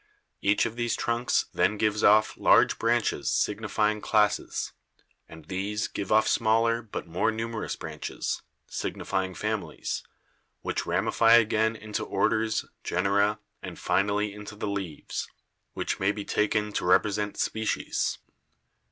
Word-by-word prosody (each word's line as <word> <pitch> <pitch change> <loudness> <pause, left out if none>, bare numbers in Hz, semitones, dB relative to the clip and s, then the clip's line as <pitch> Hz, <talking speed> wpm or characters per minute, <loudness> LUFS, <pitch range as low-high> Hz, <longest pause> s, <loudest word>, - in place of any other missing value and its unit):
Each 100 +1 +3
of 115 0 -4
these 120 -1 0
trunks 120 +1 +1
then 105 - +2
gives 105 0 +1
off 105 +1 +5
large - - +4
branches - - +1
signifying 105 0 0
classes, 105 -2 +1 0.6
and 80 -2 -12
these 100 +3 -2
give 100 - -5
off 110 0 +5
smaller 115 +1 +2
but 110 -5 -6
more 90 +6 0
numerous 115 0 -3
branches, - - -4 0.2
signifying 95 -1 -3
families, - - -3 0.6
which - - -3
ramify 115 0 +3
again 110 -1 +4
into 110 -1 -4
orders, 110 0 +1 0.2
genera 100 +3 +1 0.2
and - - -7
finally 105 +1 +1
into 105 0 -9
the 105 - -4
leaves, 95 -6 -4 0.5
which - - -2
may 95 +1 +2
be 105 -1 -6
taken 105 0 0
to - - -1
represent 105 +3 +2
species. 110 0 -1
105 Hz, 125 wpm, -27 LUFS, 100-110 Hz, 0.6 s, off